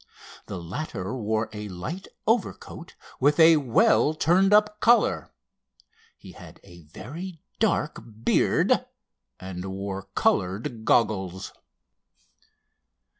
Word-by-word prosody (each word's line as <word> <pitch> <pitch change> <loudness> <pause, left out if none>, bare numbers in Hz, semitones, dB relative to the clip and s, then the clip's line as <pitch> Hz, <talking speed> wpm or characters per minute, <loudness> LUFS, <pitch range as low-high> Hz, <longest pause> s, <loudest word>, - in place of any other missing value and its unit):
The - - -5
latter 95 - -5
wore 110 -2 -1
a 105 -1 -6
light 125 - -6 0.2
overcoat 205 -5 -2 0.2
with 145 +4 +2
a 160 0 +8
well 135 +1 +3
turned 180 +6 +3
up 210 0 +3
collar. 235 0 +3 0.9
He - - -13
had - - -14
a 85 0 -15
very 165 - -9 0.2
dark 200 -8 0 0.2
beard, - - +2 0.6
and 95 -1 -7
wore 95 0 -5
colored 105 +4 0
goggles. 95 -5 0
115 Hz, 100 wpm, -25 LUFS, -, 0.9 s, a